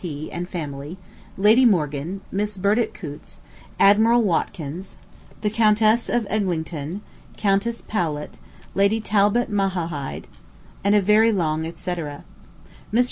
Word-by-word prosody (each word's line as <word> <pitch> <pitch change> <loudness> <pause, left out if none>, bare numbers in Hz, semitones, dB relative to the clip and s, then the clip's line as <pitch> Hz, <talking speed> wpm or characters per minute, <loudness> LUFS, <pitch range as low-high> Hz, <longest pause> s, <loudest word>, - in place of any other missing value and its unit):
P., 155 -4 -6
and 175 +1 -5
family, 150 -1 -6 0.4
Lady 215 +6 +5
Morgan, 170 - +1
Miss 205 +1 -2
Burdett 210 +4 +1
Coutts, 150 -5 -10 0.4
Admiral 225 +4 +5
Watkins, 175 -2 -2 0.5
the 210 - +1
Countess 215 +1 +3
of 240 -2 +1
Eglinton, 175 -4 -2 0.4
Countess 205 +3 0
Powlett, 155 -8 -3 0.3
Lady 200 +3 +2
Talbot 210 +2 +2
Mala 195 -1 +1 0.2
hide, 145 -5 -5 0.6
and 200 +1 +3
a 205 - +5
very 215 +3 +5
long 160 -5 0
et 165 - -9
cetera. 165 -6 -5 0.7
Mr. 225 - +2
195 Hz, 125 wpm, -23 LUFS, 160-215 Hz, 0.7 s, Lady